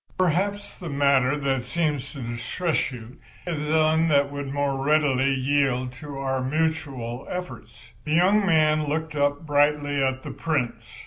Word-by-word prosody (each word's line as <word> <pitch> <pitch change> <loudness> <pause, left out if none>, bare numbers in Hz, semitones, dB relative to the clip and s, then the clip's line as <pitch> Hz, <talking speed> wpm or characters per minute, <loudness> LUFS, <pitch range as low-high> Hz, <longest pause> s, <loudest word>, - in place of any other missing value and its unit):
Perhaps 190 +3 0
the 175 - -6
matter 140 -1 +2
that 135 -3 0
seems 145 0 -2
to 140 -4 -7
distress 120 +9 -2
you 120 0 -10 0.3
is 150 -4 -3
one 160 +1 +3
that 140 -2 +3
would 140 -1 -5
more 140 -1 -1
readily 140 -3 +3
yield 130 -2 +1
to 140 +3 -8
our 135 -1 -1
mutual 135 -4 -2
efforts." 180 0 -8
The 155 - -2
young 195 +5 +4
man 155 -4 +3
looked 160 +1 -2
up 145 +2 0
brightly 145 -1 +2
at 130 0 -1
the - - -6
Prince. 140 - -2
145 Hz, 150 wpm, -25 LUFS, 135-155 Hz, 0.3 s, young